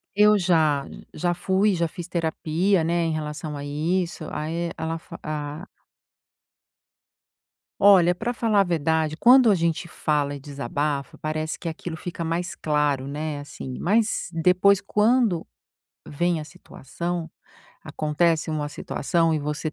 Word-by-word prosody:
Eu 210 +1 +6
já, 160 -6 +2 0.3
já 175 +2 0
fui, 190 +4 +1
já 170 -2 0
fiz 170 +2 -8
terapia, 170 +2 0
né, 165 +2 0
em 165 - 0
relação 150 0 -4
a 145 - -6
isso. 165 +4 -2
Aí 165 +3 -3
ela 160 +1 -3
fa 165 0 -11
a 150 +3 -5 2.1
Olha, 185 -3 +6
pra 230 +7 -3
falar 225 -4 +1
a - - +4
verdade, 160 -2 0
quando 250 +4 +7
a 205 - +5
gente 170 0 -1
fala 145 -3 -1
e - - -8
desabafa, 140 0 -3
parece 155 0 -3
que 175 - -7
aquilo 160 0 -5
fica 170 0 -5
mais 170 +2 -2
claro, 145 -3 0
né, 150 +1 -4
assim, 135 -2 -8
mas 215 +3 +1
depois 180 +4 +4
quando 210 -3 +2 0.6
vem 170 +2 0
a - - -6
situação, 170 +4 -6 0.5
acontece 160 +2 0
uma 150 -1 -2
situação 165 +3 0
e - - +1
você 150 +1 -3
165 Hz, 140 wpm, -24 LUFS, 150-180 Hz, 2.1 s, quando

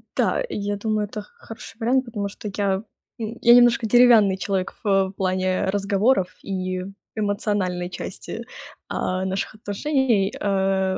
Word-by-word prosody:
Да, - - +1
я 205 - -2
думаю, 215 0 -1
это 210 +1 -6
х 205 - -17
хороший 225 0 -11
вариант, 255 +3 +2
потому 210 -4 -3
что 205 +1 -7
я 200 -1 0 0.4
н 225 +1 -5
я 235 - +7
немножко 240 -1 +5
деревянный 225 -4 +6
человек 190 -1 -2
в 195 -2 +2
плане 185 0 0
разговоров 200 +1 +2
и 185 -1 -3 0.3
эмоциональной 205 -4 -1
части, 195 +5 -7 0.4
а, 185 +1 -2
наших 190 +2 -3
отношений. 215 -1 0
Э, 190 -1 +1
200 Hz, 135 wpm, -23 LUFS, 190-225 Hz, 0.4 s, я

